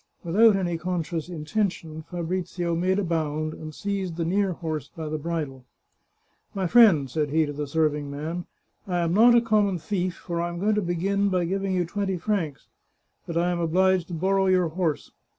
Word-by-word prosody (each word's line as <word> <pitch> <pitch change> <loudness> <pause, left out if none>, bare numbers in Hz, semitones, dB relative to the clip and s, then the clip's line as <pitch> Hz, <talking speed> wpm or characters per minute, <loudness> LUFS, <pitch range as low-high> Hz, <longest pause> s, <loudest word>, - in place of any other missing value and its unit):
Without 205 +5 +5
any 175 -3 -1
conscious 170 -1 -3
intention, 165 -1 -2
Fa 175 +2 -6
brizio 175 0 -2
made 185 +3 +1
a 205 - +1
bound, 155 -2 -1
and 155 -1 -8
seized 190 0 -3
the 165 - -1
near 190 +2 +1
horse 155 -4 -4
by 160 -2 -5
the 155 0 -3
bridle. 150 -5 -4 0.5
" - - -42
My 190 -1 -1
friend," 180 - +6
said 150 +3 -1
he 160 +2 +2
to 145 - -5
the 145 0 -4
serving 150 -1 0
man, 160 +5 -5 0.2
" - - -47
I 180 -2 -1
am 170 0 0
not 235 +4 +6
a 235 - +6
common 210 -4 +2
thief, 180 +2 -2
for 170 -1 -3
I 170 - -1
am 170 - -6
going 210 +3 +2
to 210 - +1
begin 195 +3 0
by 180 -2 +1
giving 195 +2 -1
you 180 -1 +1
twenty 190 +1 -2
francs; 170 -6 -2 0.6
but 170 - -3
I 175 +1 +2
am 175 - -1
obliged 180 +2 +2
to 175 - -5
borrow 190 +3 +2
your 185 -2 +3
horse. 160 -2 -2
175 Hz, 205 wpm, -25 LUFS, 160-190 Hz, 0.6 s, friend